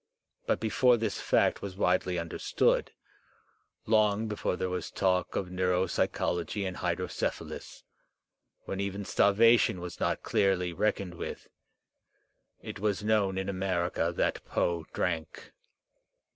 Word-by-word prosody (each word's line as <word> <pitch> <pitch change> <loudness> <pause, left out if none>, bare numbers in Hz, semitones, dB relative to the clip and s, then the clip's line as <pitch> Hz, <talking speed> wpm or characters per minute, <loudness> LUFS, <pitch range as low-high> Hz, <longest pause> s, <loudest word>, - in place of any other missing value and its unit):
But - - +1
before 120 +3 +3
this 110 -2 -2
fact - - +2
was 95 -2 -6
widely 90 -1 +1
understood, 85 0 0 0.9
long 110 0 +3
before 105 -3 -2
there 95 - -2
was 90 0 -3
talk 90 -2 0
of 95 - -2
neuropsychology 90 +1 0
and 95 - -5
hydrocephalus, - - -3 0.8
when 95 - -4
even 100 0 -3
starvation 110 -1 +4
was 90 -1 -7
not - - -1
clearly 90 -3 +1
reckoned 100 -1 -1
with, 85 - -7 1.1
it - - -7
was 105 0 -1
known 105 -3 +2
in 95 - -2
America 90 -3 0
that - - 0
Poe 85 -2 -1
drank. 80 -3 -3
95 Hz, 115 wpm, -29 LUFS, 90-105 Hz, 1.1 s, starvation